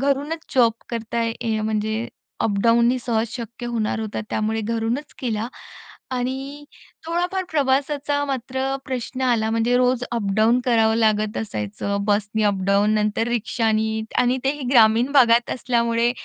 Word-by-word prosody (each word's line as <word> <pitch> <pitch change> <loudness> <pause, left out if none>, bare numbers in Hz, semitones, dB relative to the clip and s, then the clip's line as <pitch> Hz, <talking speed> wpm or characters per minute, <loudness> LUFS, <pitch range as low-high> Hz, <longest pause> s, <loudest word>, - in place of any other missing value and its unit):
घरूनच 285 +4 -1
जॉब 235 -3 +5 0.2
करता 230 0 -3
आहे 230 0 0 0.2
य - - -1
म्हणजे 220 +1 -1 0.4
अप-डाउननी 235 +4 +3
सहज 230 -1 -1
शक्य 235 0 -7
होणार 225 -2 -1
होतं 215 -1 -4
त्यामुळे 220 +1 -1
घरूनच 230 +6 -2
केला. 230 -3 -2 0.6
आणि 265 +3 -4 0.4
थोडाफार 355 +3 -1
प्रवासाचा 285 0 0
मात्र 260 -1 -3 0.2
प्रश्न 255 0 -4
आला 230 -4 +2
म्हणजे 230 +2 +2
रोज 250 0 +2
अप-डाउन 220 +2 +2
करावं 225 -3 +3
लागत 215 -1 +1
असायचं, 105 - -3
बसनी 210 +1 0
अप-डाउन 200 +1 +2
नंतर 215 +1 0
रिक्षानी 220 -2 0 0.2
आणि 250 +1 +2
तेही 285 +1 -1
ग्रामीण 235 +2 +5
भागात 240 -3 +5
असल्यामुळे 235 -1 +1
235 Hz, 130 wpm, -22 LUFS, 220-255 Hz, 0.6 s, जॉब